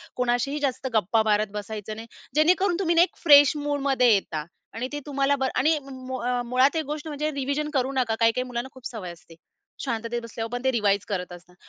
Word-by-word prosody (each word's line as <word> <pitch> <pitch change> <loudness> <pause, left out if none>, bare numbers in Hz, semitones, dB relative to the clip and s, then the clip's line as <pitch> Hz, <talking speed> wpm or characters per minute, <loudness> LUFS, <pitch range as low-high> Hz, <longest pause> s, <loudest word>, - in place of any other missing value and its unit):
कोणाशीही 250 +4 0
जास्त 265 -2 -2
गप्पा 220 +1 +2
मारत 215 0 +2
बसायचं 210 0 -6
नाही. 225 +1 -9 0.3
जेणेकरून 355 +4 +3
तुम्ही 340 -3 +1
ना, 335 - +6
एक 355 - +2
फ्रेश 290 -2 +7
मूडमध्ये 275 -4 +2
येता 160 -6 -1 0.3
आणि 240 +3 -3
ते 290 - -2
तुम्हाला 280 -1 +1
बरं 265 -1 -1
आणि 310 +4 +3
मुळा 255 -1 -3
मुळात 255 +5 +3
एक 320 -1 -1
गोष्ट 300 +2 -5
म्हणजे 305 0 -2
रिव्हिजन 280 +2 -2
करू 265 -1 +1
नका. 250 -4 0
काही-काही 230 +2 +3
मुलांना 245 +1 -4
खूप 260 -1 -15
सवय 210 -8 -7
असते, 170 -1 -15 0.5
शांततेत 235 -2 -3
बसल्यावर 230 0 -6
पण 245 0 -4
ते 265 - +3
रिवाइज 205 -4 +1
करत 185 -4 -3
असतात. 175 0 -14
255 Hz, 195 wpm, -25 LUFS, 225-285 Hz, 0.5 s, फ्रेश